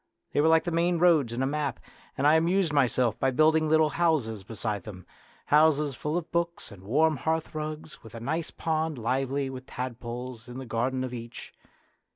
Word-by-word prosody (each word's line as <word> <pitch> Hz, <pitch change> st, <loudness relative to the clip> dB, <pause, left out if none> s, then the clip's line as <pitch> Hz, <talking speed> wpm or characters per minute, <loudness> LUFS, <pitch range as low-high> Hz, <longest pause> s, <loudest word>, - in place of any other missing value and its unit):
They -, -, +2 dB
were 155 Hz, -, +3 dB
like 160 Hz, 0 st, +5 dB
the 175 Hz, -, -3 dB
main 170 Hz, +1 st, +1 dB
roads 160 Hz, -8 st, +4 dB
in 120 Hz, +3 st, -2 dB
a -, -, +2 dB
map, 140 Hz, -2 st, -2 dB, 0.4 s
and 140 Hz, -, 0 dB
I 150 Hz, -, +6 dB
amused 170 Hz, +1 st, +2 dB
myself 125 Hz, -5 st, +2 dB
by 135 Hz, -, +2 dB
building 155 Hz, +3 st, +3 dB
little 155 Hz, 0 st, +4 dB
houses 140 Hz, -, 0 dB
beside 105 Hz, 0 st, -4 dB
them 90 Hz, -5 st, -10 dB, 0.4 s
houses 150 Hz, -1 st, +4 dB
full 150 Hz, +5 st, -2 dB
of 175 Hz, -, -5 dB
books 170 Hz, 0 st, -2 dB
and 100 Hz, -2 st, -12 dB
warm 150 Hz, +9 st, +2 dB
hearthrugs, 155 Hz, 0 st, -3 dB
and -, -, -30 dB
with 110 Hz, -, -11 dB
a -, -, -6 dB
nice 155 Hz, +7 st, -2 dB
pond 160 Hz, -2 st, -2 dB
lively 135 Hz, +4 st, -1 dB
with 130 Hz, 0 st, -9 dB
tadpoles 125 Hz, -1 st, -6 dB
in 125 Hz, +1 st, -8 dB
the 130 Hz, -, -6 dB
garden 125 Hz, +3 st, -1 dB
of 130 Hz, -1 st, -5 dB
each. 115 Hz, -1 st, -8 dB
140 Hz, 195 wpm, -27 LUFS, 120-160 Hz, 0.4 s, I